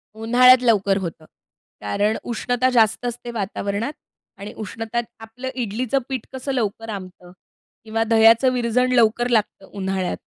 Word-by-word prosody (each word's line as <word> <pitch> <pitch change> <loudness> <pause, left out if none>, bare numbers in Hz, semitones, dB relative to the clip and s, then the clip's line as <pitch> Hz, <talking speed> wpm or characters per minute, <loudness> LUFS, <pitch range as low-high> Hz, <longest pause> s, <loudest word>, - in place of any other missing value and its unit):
उन्हाळ्यात 250 +3 +5
लवकर 200 -5 +3
होतं. 165 -4 -6 0.6
कारण 205 - 0
उष्णता 245 +2 0
जास्त 225 -1 +2
असते 240 0 -5
वातावरणात 205 +3 -3 0.4
आणि 200 +2 -8
उष्णता 225 +2 -4 0.2
आपलं 225 +4 -7
इडलीचं 245 +2 -1
पीठ 260 -4 -4
कसं 260 +1 -4
लवकर 225 -2 -2
आंबतं 185 -3 -8 0.5
किंवा 225 0 -1
दह्याचं 225 +3 +5
विरजण 250 +1 +1
लवकर 240 0 +3
लागतं 215 -4 0
उन्हाळ्यात, 190 -2 -2
225 Hz, 130 wpm, -21 LUFS, 205-245 Hz, 0.6 s, उन्हाळ्यात